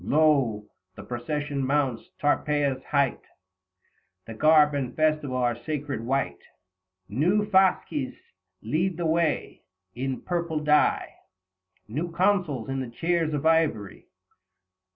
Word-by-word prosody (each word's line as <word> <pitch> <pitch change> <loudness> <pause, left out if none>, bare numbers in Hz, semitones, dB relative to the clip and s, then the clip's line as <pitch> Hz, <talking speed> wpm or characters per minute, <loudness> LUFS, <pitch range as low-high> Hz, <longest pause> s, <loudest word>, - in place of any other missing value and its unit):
85 - - -3
Lo! 135 -9 +3 0.3
the 100 - -9
procession 140 +5 -3
mounts 135 -3 0
Tarpeia's 145 -2 +1
height; 140 -3 +1 1.0
The 115 - -8
garb 150 +4 +5
and 130 -3 -3
festival 155 -4 +1
are 120 -2 +1
sacred 140 0 -4
white; 135 +3 -1 0.7
New 175 - +1
fasces 185 -8 +2 0.5
lead 165 - -1
the 170 - -2
way; 160 -1 0 0.3
in 130 +1 -3
purple 170 -3 -2
dye 150 -1 +2 0.7
New 155 +10 -3
consuls 175 - +1
in 135 0 -2
the 130 -2 -4
chairs 165 +4 0
of 145 +1 -3
ivory. 155 - +1
150 Hz, 115 wpm, -26 LUFS, 130-160 Hz, 1.0 s, garb